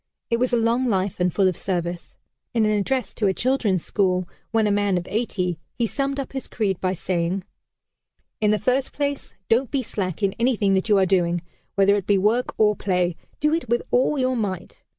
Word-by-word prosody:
It 230 Hz, -, +3 dB
was 250 Hz, +2 st, +1 dB
a 240 Hz, -, +3 dB
long 235 Hz, +3 st, +2 dB
life 190 Hz, -4 st, 0 dB
and 180 Hz, 0 st, +2 dB
full 195 Hz, +2 st, +3 dB
of 185 Hz, -, +1 dB
service. 175 Hz, -2 st, -4 dB, 0.4 s
In 225 Hz, -2 st, +3 dB
an 215 Hz, -, +2 dB
address 210 Hz, +2 st, 0 dB
to 210 Hz, -, 0 dB
a 190 Hz, -, +1 dB
children's 225 Hz, -9 st, +1 dB
school, 185 Hz, -3 st, +1 dB, 0.2 s
when 225 Hz, -1 st, +2 dB
a 210 Hz, -, +2 dB
man 200 Hz, -2 st, +2 dB
of 175 Hz, -, -4 dB
eighty, 185 Hz, -6 st, -1 dB, 0.2 s
he 240 Hz, -, +1 dB
summed 275 Hz, +4 st, -2 dB
up 275 Hz, -, -5 dB
his 265 Hz, -, -5 dB
creed 195 Hz, -5 st, -1 dB
by 185 Hz, 0 st, +1 dB
saying: 180 Hz, +1 st, -1 dB, 1.0 s
"In 210 Hz, -, +2 dB
the 215 Hz, -, +3 dB
first 255 Hz, +5 st, 0 dB
place, 285 Hz, -1 st, -3 dB
don't 235 Hz, +2 st, +2 dB
be 275 Hz, -2 st, -1 dB
slack 195 Hz, -3 st, -4 dB
in 195 Hz, -1 st, +2 dB
anything 225 Hz, -5 st, +2 dB
that 190 Hz, +3 st, 0 dB
you 205 Hz, -, +5 dB
are 190 Hz, -, +4 dB
doing. 175 Hz, -2 st, +1 dB, 0.3 s
Whether 200 Hz, 0 st, +5 dB
it 200 Hz, -2 st, -1 dB
be 205 Hz, -, +4 dB
work 220 Hz, +6 st, +1 dB
or 210 Hz, -1 st, +4 dB
play, 180 Hz, -4 st, 0 dB, 0.2 s
do 300 Hz, +1 st, +2 dB
it 330 Hz, -7 st, -1 dB
with 240 Hz, +1 st, +1 dB
all 260 Hz, +4 st, +3 dB
your 255 Hz, -1 st, +1 dB
might. 190 Hz, -6 st, -4 dB
205 Hz, 210 wpm, -23 LUFS, 185-240 Hz, 1.0 s, you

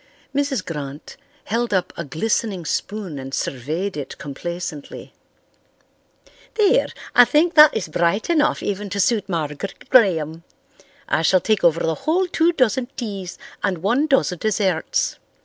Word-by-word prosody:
Mrs. 275 Hz, -7 st, -1 dB
Grant 145 Hz, -3 st, -7 dB, 0.3 s
held 230 Hz, 0 st, -1 dB
up 185 Hz, -, -1 dB
a 170 Hz, -, -4 dB
glistening 185 Hz, +4 st, -2 dB
spoon 195 Hz, -5 st, -3 dB
and 135 Hz, +1 st, -5 dB
surveyed 155 Hz, +10 st, -3 dB
it 145 Hz, -3 st, -6 dB
complacently. 155 Hz, +1 st, -7 dB, 1.4 s
"There, 445 Hz, +3 st, +3 dB, 0.3 s
I 245 Hz, -, +8 dB
think 315 Hz, +7 st, +2 dB
that 300 Hz, -5 st, +7 dB
is 200 Hz, -, -3 dB
bright 170 Hz, +6 st, 0 dB
enough 310 Hz, -3 st, +2 dB
even 205 Hz, 0 st, -3 dB
to 200 Hz, +1 st, -3 dB
suit 205 Hz, 0 st, +1 dB
Margaret 165 Hz, +2 st, -4 dB
Graham. 165 Hz, -, +3 dB, 0.6 s
I -, -, +1 dB
shall 185 Hz, +3 st, +4 dB
take 215 Hz, +2 st, 0 dB
over 170 Hz, -1 st, +4 dB
the 165 Hz, -, +1 dB
whole 330 Hz, -, 0 dB
two 335 Hz, -1 st, +2 dB
dozen 255 Hz, -5 st, +1 dB
teas 195 Hz, -6 st, -5 dB, 0.2 s
and 185 Hz, -5 st, -2 dB
one 250 Hz, +10 st, +2 dB
dozen 265 Hz, -, +1 dB
desserts. 210 Hz, -, 0 dB
195 Hz, 140 wpm, -21 LUFS, 165-245 Hz, 1.4 s, I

